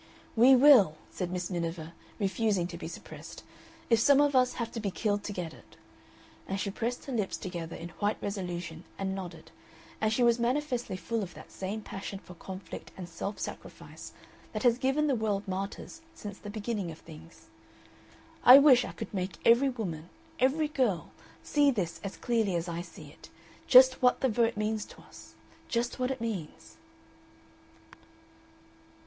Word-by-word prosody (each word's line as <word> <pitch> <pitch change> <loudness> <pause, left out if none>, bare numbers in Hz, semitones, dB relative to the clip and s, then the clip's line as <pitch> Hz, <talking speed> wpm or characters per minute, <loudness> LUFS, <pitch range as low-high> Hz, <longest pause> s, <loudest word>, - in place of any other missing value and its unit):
"We 250 +4 +7
will," 250 - +7 0.2
said 180 -2 -3
Miss 180 0 -3
Miniver, 165 -2 -4 0.2
refusing 200 -2 0
to - - -7
be - - -6
suppressed, - - -10 0.4
"if 230 -2 +4
some 280 +4 +5
of 290 -1 +3
us 255 -1 +4
have 230 -1 -4
to 230 - -5
be 210 -2 -2
killed 205 +1 -1
to - - -3
get 175 -5 -5
it." - - -18 0.7
And 195 +1 -2
she 200 - -2
pressed 240 +4 -3
her 275 - -5
lips 210 -5 -1
together 170 -3 -6
in 170 - -7
white 205 +1 +1
resolution 175 -4 -5
and 190 -1 -2
nodded, 185 -2 -8 0.5
and 215 0 +2
she 245 +3 +2
was 235 0 +4
manifestly 245 -4 -1
full 220 +6 -2
of 180 -4 -6
that - - -12
same 200 +3 -4
passion 195 0 -6
for 180 - -13
conflict 190 +2 -9
and 180 -2 -6
self 175 +5 -5
sacrifice - - -8 0.4
that 215 - -3
has 240 -1 +4
given 270 +4 +1
the 285 - +2
world 210 -3 -1
martyrs 195 +11 -5
since 205 -2 -8
the 205 - -8
beginning 210 -3 -3
of 160 - -8
things. 160 +1 -15 0.9
"I 250 +2 +11
wish 275 -3 +7
I - - -6
could - - -7
make 185 -1 -3
every 240 +4 +6
woman, 180 -10 -5 0.3
every 295 +4 +2
girl, 245 - 0 0.3
see 290 -1 +3
this 190 -10 -2
as 200 - -6
clearly 225 -6 0
as 170 +1 -2
I 170 0 -3
see 175 - -12
it - - -16 0.4
just 255 0 +7
what 250 -1 +3
the 265 - +3
Vote 230 0 +1
means 215 0 -1
to - - -15
us. - - -15 0.3
Just 240 +2 -1
what 255 0 0
it 265 -3 -4
means...." 155 - -6
210 Hz, 175 wpm, -30 LUFS, 180-245 Hz, 0.9 s, I